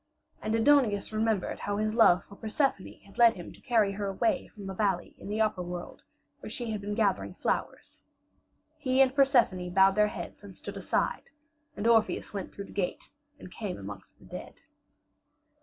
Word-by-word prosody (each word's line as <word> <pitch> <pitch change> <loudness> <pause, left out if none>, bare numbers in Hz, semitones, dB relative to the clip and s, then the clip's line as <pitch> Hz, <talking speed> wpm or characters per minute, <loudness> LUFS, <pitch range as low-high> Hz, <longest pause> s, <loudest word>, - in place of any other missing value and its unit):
And 215 +1 -1
Aidoneus 225 -4 +3
remembered 215 -3 0
how 205 0 -2
his 215 0 0
love 190 -6 +5
for 200 - -14
Persephone 220 0 -1
had 200 - -15
led 235 -1 +7
him 175 - -9
to - - -18
carry 225 -6 +2
her 200 0 -3
away 270 - 0
from 205 -3 -12
the 195 - -4
valley 190 -3 -1
in - - -10
the 210 +2 -2
upper 215 -4 +1
world 175 0 -7 0.4
where - - -8
she 240 -2 -4
had 210 -2 -3
been 205 +1 -3
gathering 205 -3 0
flowers. - - -3 0.8
He 260 -3 +1
and 265 -1 +5
Persephone 245 -10 +3
bowed 190 +2 +5
their 210 +1 +4
heads - - -8
and - - -11
stood - - -7
aside, - - -1 0.5
and 205 - -3
Orpheus 225 -2 +2
went 195 -2 -5
through 200 - -7
the - - -14
gate 190 -3 -3 0.3
and 185 - -12
came 205 -2 -5
amongst 100 -1 -10
the - - -19
dead. - - -9
210 Hz, 185 wpm, -29 LUFS, 195-230 Hz, 0.8 s, led